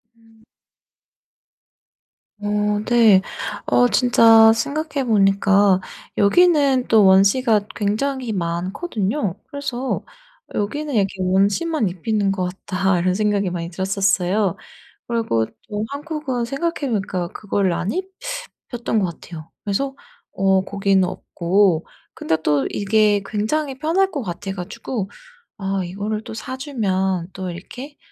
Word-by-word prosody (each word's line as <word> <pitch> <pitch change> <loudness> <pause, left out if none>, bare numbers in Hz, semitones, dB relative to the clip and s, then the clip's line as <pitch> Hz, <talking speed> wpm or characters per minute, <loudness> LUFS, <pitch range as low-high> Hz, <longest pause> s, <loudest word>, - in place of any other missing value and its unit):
음. 225 -1 -24 2.0
어 205 - -5 0.4
네. 225 -5 +6 0.4
어 245 0 +4
진짜 225 -3 +6
생각해 285 +3 -2
보니까 200 -2 +4 0.4
여기는 280 - +4
또 215 -3 +5
원지가 205 +3 +4
굉장히 240 +4 -1
많거든요. 190 - -2
그래서 270 -2 -3 0.5
'여기는 290 +9 -2
이렇게 195 -3 +1
원지만 200 - +1
입히는 195 +3 -1
것 185 -2 -1 0.2
같다.' 190 -1 +1
이런 180 +1 +1
생각이 205 -1 0
많이 170 -1 -4
들었었어요. 195 +1 0 0.5
그리고 225 - 0 0.2
또 210 0 -2
한국은 285 -4 -3
생각해 280 +2 -2
보니까 190 -4 -2
그거를 195 -1 -1
안 180 +3 -2 0.6
입혔던 235 -2 -4
것 175 -5 -2
같아요. 165 -2 -10
그래서 270 +7 -1 0.4
어 190 -1 +2
거기는 195 -1 +2
없고 180 -1 +1 0.3
근데 160 - 0
또 145 -2 +1
이게 205 0 +2
굉장히 265 +6 -2
편할 365 +6 +1
것 285 -5 -4
같아 190 +1 -5
가지고 195 +3 -5 0.5
아 195 -1 -1
이거를 205 +4 -4
또 - - -8
사주면 195 - -2
또 185 -1 -4
이렇게 250 - -9
205 Hz, 250 characters per minute, -21 LUFS, 190-245 Hz, 2.0 s, 네